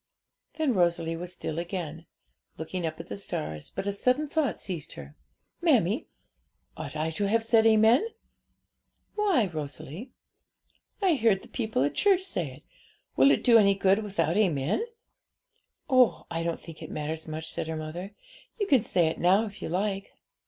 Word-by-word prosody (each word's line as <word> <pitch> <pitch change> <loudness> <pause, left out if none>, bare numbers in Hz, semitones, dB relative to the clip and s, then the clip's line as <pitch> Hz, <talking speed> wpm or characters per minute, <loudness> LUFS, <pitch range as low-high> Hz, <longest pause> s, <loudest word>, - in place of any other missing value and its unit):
Then 310 -5 +1
Rosalie 170 -3 +1
was 175 +2 -5
still 165 -3 -4
again, 170 -2 -5 0.5
looking 165 +2 -3
at 155 0 -5
the 165 +1 -7
stars; 75 - -5
but - - -5
a 200 - 0
sudden 250 +9 +1
thought 295 -4 0
seized 175 -6 -5
her. 70 +1 -10 0.5
'Mammie, - - +2 0.7
ought 155 -1 -7
I 155 +1 -1
to 200 +6 -1
have 225 +2 +2
said 225 0 +4
amen?' 225 - +5 1.1
'Why, 395 - +2
Rosalie?' 155 - -6 0.9
'I 365 -4 +4
heard 220 -5 +3
the - - -14
people 220 - -1
at 145 - 0
church 390 -3 +3
say 175 - -2
it. 135 +3 -14 0.5
Will 135 +1 +6
it 140 - +3
do 230 -2 +7
any 200 -2 +4
good 195 +2 +3
without 195 -4 0
amen?' 180 - +1 1.0
'Oh, 255 -4 +4
I 165 0 -2
don't 170 0 -2
think 165 -2 -12
it - - -7
matters 155 +2 -4
much,' 155 0 -5
said - - -3
her 160 0 -3
mother; 175 +6 -6 0.4
'you 410 - +1
can 275 - +4
say 175 -4 +2
it 160 - -1
now, 190 +5 +4
if 205 -1 -10
you - - -4
like.' 195 +2 -1
185 Hz, 165 wpm, -28 LUFS, 160-225 Hz, 1.1 s, do